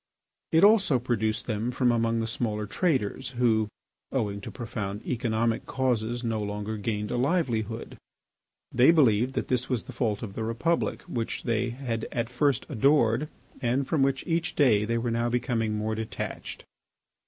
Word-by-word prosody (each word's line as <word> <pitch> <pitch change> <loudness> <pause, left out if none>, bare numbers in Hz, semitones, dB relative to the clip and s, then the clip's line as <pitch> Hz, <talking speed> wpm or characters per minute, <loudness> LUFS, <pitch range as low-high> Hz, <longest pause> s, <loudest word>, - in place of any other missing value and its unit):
It 160 - +4
also 200 - +6
produced 115 -2 -1
them 110 +1 -1
from 125 0 +2
among 115 -1 +1
the 115 - -2
smaller 110 -2 -2
traders, 130 - -1
who, 110 -3 +3 0.4
owing 105 -6 -1
to - - -7
profound 105 -4 -5
economic 115 -2 0
causes, 120 -2 0
no 115 -2 -1
longer 105 +1 -3
gained 105 0 -2
a 125 - 0
livelihood. 120 - -1 0.7
They 125 +4 +5
believed 130 -6 +4
that - - -1
this 125 -1 0
was 125 -5 0
the 130 - -10
fault 115 -4 -1
of 100 -4 -6
the 110 - -3
republic 120 +10 0
which 120 -10 -4
they 120 0 0
had 120 -2 -3
at 115 -1 -2
first 135 0 +1
adored 135 0 +3 0.3
and 125 +3 +1
from 155 -4 +1
which 135 -1 +1
each 170 +1 -1
day 110 -8 +4
they 115 +2 0
were 115 0 -1
now 115 +1 0
becoming 115 -3 0
more 110 +1 -1
detached. 110 0 -5
120 Hz, 165 wpm, -27 LUFS, 110-130 Hz, 0.7 s, also